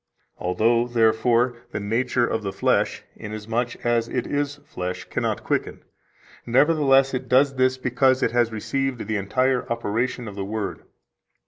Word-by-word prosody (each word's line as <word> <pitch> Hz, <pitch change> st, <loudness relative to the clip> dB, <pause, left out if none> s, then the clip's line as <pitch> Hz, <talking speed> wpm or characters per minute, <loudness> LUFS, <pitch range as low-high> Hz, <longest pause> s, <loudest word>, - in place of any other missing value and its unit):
Although, 115 Hz, +7 st, +2 dB
therefore, 115 Hz, +1 st, +2 dB
the -, -, -4 dB
nature 120 Hz, +4 st, 0 dB
of 110 Hz, -, -2 dB
the 100 Hz, -2 st, -3 dB
flesh, -, -, 0 dB
inasmuch 110 Hz, +4 st, -4 dB
as 120 Hz, -1 st, +2 dB
it 125 Hz, -, -2 dB
is 145 Hz, 0 st, -1 dB
flesh, 90 Hz, 0 st, -5 dB
cannot -, -, -2 dB
quicken, -, -, -2 dB, 0.6 s
nevertheless 135 Hz, +1 st, +3 dB
it 130 Hz, -1 st, -4 dB
does 135 Hz, +2 st, +4 dB
this 130 Hz, 0 st, +2 dB
because 130 Hz, +1 st, +2 dB
it -, -, +2 dB
has 120 Hz, -1 st, +2 dB
received 130 Hz, +3 st, -2 dB
the 110 Hz, -1 st, 0 dB
entire 125 Hz, +6 st, 0 dB
operation 115 Hz, +2 st, -2 dB
of 105 Hz, -, -7 dB
the 100 Hz, 0 st, -4 dB
Word. 105 Hz, +1 st, -4 dB
120 Hz, 145 wpm, -23 LUFS, 110-130 Hz, 0.6 s, does